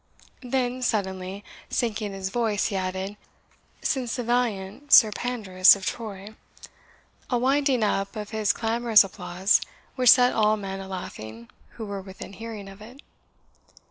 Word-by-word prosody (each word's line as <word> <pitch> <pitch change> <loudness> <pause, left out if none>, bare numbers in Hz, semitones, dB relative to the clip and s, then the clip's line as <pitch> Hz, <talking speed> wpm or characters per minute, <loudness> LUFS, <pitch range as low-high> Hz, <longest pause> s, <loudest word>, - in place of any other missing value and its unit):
then, 255 0 -2
suddenly 195 -4 -2 0.3
sinking 215 -3 -2
his 195 -1 -5
voice, 220 -3 0
he 200 - -4
added 190 +2 -3 0.7
"since 260 -6 -1
the 245 - -3
valiant 235 +1 -2
Sir 220 -4 +8
Pandarus 205 -6 +4
of 195 -1 -8
Troy," 215 -3 -6 1.0
a 245 - +1
winding 265 -1 +2
up 195 -1 -1
of 210 -1 -6
his 215 -2 +1
clamorous 230 -1 +4
applause 190 0 0 0.3
which 255 -2 +4
set 250 +1 +6
all 215 -1 +3
men 195 -1 -5
a 195 - -8
laughing 115 - -8 0.2
who 225 - -7
were 200 -1 -5
within 190 0 -10
hearing 215 0 -8
of 195 +1 -13
it. 245 +6 -13
210 Hz, 140 wpm, -25 LUFS, 195-240 Hz, 1.0 s, Sir